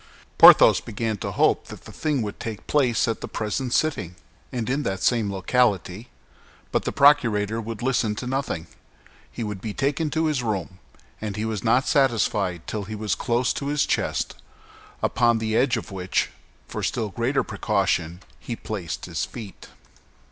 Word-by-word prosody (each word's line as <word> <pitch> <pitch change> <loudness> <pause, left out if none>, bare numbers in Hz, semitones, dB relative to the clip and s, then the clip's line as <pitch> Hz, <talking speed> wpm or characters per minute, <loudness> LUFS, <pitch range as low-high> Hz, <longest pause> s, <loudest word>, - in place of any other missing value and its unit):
Porthos - - +9
began 110 0 -3
to - - -4
hope - - +2
that - - -11
the - - -10
thing 150 -6 -1
would 105 -1 -6
take 110 -2 -6
place 130 -7 +2
at 115 -2 -2
the - - -4
present 115 +4 -3
sitting, 120 - 0 0.4
and 120 -3 -3
in 135 +4 0
that 95 -8 -3
same 115 -5 +2
locality; 100 +1 0 0.6
but - - 0
the - - 0
procurator 115 -7 +3
would 115 0 -6
listen 120 -5 +1
to 125 - -5
nothing, 130 -10 -2 0.7
he 115 - -5
would 105 -3 -5
be 105 0 -5
taken 145 +3 0
to 160 +1 0
his 150 -5 0
room, 95 -5 -3 0.4
and 105 -2 -4
was 110 -3 -3
not 120 +3 +3
satisfied 105 - +1
till 105 -2 -4
he 110 +2 -6
was 105 -2 -1
close 120 +1 0
to 140 - -4
his 145 0 +1
chest, - - -1 0.7
upon 120 -1 +3
the 110 -1 -1
edge 130 +1 +3
of 110 - -7
which, 90 -1 -1 0.4
for - - -5
still 110 -3 -1
greater 120 +8 0
precaution, 95 -5 -1 0.2
he 120 - -5
placed 100 -7 -5
his - - -3
feet. 105 -5 -10
110 Hz, 170 wpm, -24 LUFS, 100-125 Hz, 0.7 s, Porthos